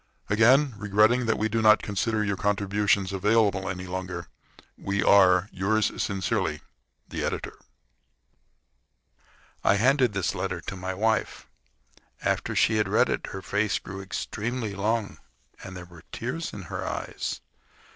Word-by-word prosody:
Again 130 +6 +5
regretting 105 +4 +3
that 110 - +2
we 110 - +1
do 110 +1 -1
not 110 -1 +5
consider 110 +2 -1
your 100 -1 0
contributions 100 -1 +1
available 100 -1 +2
any 90 -1 -5
longer, 90 -1 -5 0.5
we 100 0 -2
are, 95 -1 +5
yours 105 +3 +1
sincerely, 95 -5 -1 0.5
THE - - -4
EDITOR. - - -3 2.1
I 95 - +4
handed 125 +1 +3
this 100 -2 -1
letter - - -3
to - - -7
my 95 0 -4
wife. 110 +3 0 0.8
After - - -1
she 110 - +3
had 105 - +1
read - - +3
it - - -2
her 95 0 -7
face 105 -1 0
grew 95 0 -8
extremely 110 +3 -4
long, 105 +2 -1 0.4
and 95 -1 -8
there 90 - -8
were 85 -1 -15
tears 160 +8 -4
in 100 - -8
her 85 - -5
eyes. - - -4
100 Hz, 140 wpm, -26 LUFS, 95-110 Hz, 2.1 s, Again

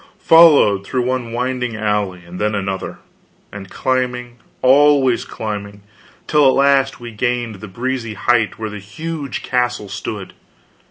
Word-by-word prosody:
Followed 150 - +6
through 125 +4 -2
one 125 -2 -2
winding 125 0 -2
alley 105 -4 -2
and 90 +1 -9
then 105 0 0
another, 95 -1 -4 0.5
and 95 -1 -9
climbing, 125 -2 -2 0.3
always 135 -1 +4
climbing 100 -2 -6 0.4
till 150 -2 +4
at 130 - +4
last 140 -1 +2
we 120 -1 -8
gained 120 -1 -2
the 110 - -8
breezy 120 +2 -4
height 110 +2 +1
where 110 -1 -5
the 105 - -7
huge 140 +7 -6
castle 120 -4 -1
stood. 105 -1 -6
120 Hz, 140 wpm, -18 LUFS, 105-130 Hz, 0.5 s, Followed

